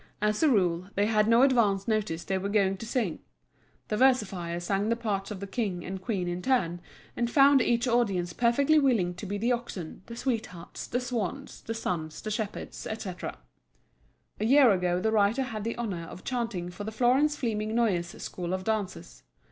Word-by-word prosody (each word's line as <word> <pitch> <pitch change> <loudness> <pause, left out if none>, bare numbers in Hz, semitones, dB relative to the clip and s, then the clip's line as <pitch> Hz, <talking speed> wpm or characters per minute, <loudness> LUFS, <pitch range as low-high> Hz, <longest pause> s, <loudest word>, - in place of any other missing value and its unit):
As 210 0 +1
a 315 - +5
rule 185 -5 +1
they 205 - +2
had 215 -1 +2
no 230 +2 +6
advance 215 -8 +3
notice 210 -7 -1
they 190 -1 -1
were 200 +2 -3
going 200 -2 +2
to 225 - -7
sing. 220 -9 -1 0.7
The 210 - 0
versifier 195 -10 +2
sang 195 +4 -1
the 230 - +2
parts 205 -4 -2
of 210 -3 -6
the - - -3
King 195 -4 -3
and 190 0 -5
Queen 190 -4 -2
in 175 +1 -3
turn, 180 -9 +1 0.3
and 235 -1 0
found 275 +1 +6
each 240 +1 +1
audience 200 -8 +1
perfectly 275 +6 +3
willing 230 -11 +2
to 185 +3 -8
be 205 +2 -2
the 230 +4 +1
oxen, 230 -10 -4
the 230 - -7
sweethearts, 225 -9 -4
the 245 - -1
swans, 250 +1 -4
the 225 - -5
sons, 160 -8 -3
the 215 - -3
shepherds, 215 -1 -4
etc. 195 -5 -5 1.0
A 215 - 0
year 265 0 +6
ago 180 -2 +1
the 220 +4 0
writer 220 +4 +3
had 220 -5 -5
the 230 +1 -2
honor 195 -8 -3
of 175 - -10
chanting 230 -9 -3
for 205 - -7
the 220 - -4
Florence 255 +6 +3
Fleming 220 -4 -2
Noyes 185 -8 +1
school 180 0 -3
of 185 - -5
dancers. 210 -3 -3
215 Hz, 190 wpm, -28 LUFS, 185-235 Hz, 1.0 s, no